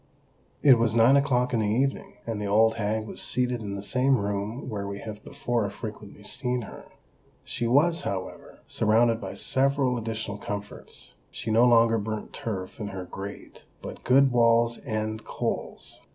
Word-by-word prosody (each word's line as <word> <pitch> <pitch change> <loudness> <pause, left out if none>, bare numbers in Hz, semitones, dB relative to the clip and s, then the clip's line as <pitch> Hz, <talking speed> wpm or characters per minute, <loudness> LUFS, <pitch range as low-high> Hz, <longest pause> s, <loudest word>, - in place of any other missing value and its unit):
It 130 -5 +7
was 115 -1 +1
nine 115 +4 +6
o'clock 125 -3 +2
in 115 - +2
the 105 - +1
evening; 135 +5 0
and 110 -3 -3
the 105 - -2
old 110 +2 +4
hag 110 0 -1
was - - -7
seated 125 -1 0
in 100 -2 -4
the 100 - -5
same 130 +5 +2
room 105 +5 -3
where 100 -4 -4
we 100 0 -5
have 105 0 -8
before 120 -6 -2
frequently - - -9
seen 125 -1 -2
her. - - -10 0.6
She 120 - -3
was, 160 +7 +3
however, 95 -1 -6
surrounded 115 +1 +2
by - - -6
several 135 -2 +1
additional 110 -2 -4
comforts. 105 0 -7 0.2
She 110 - -5
no 115 +3 +5
longer 115 -1 +5
burnt 110 0 -5
turf 95 -4 -5
in 105 - -4
her 95 -2 -6
grate, 95 +3 -9 0.2
but - - -8
good 135 +1 +5
Wall's 115 -1 +3
End 110 -1 -2
coals. - - -4
115 Hz, 165 wpm, -26 LUFS, 105-125 Hz, 0.6 s, It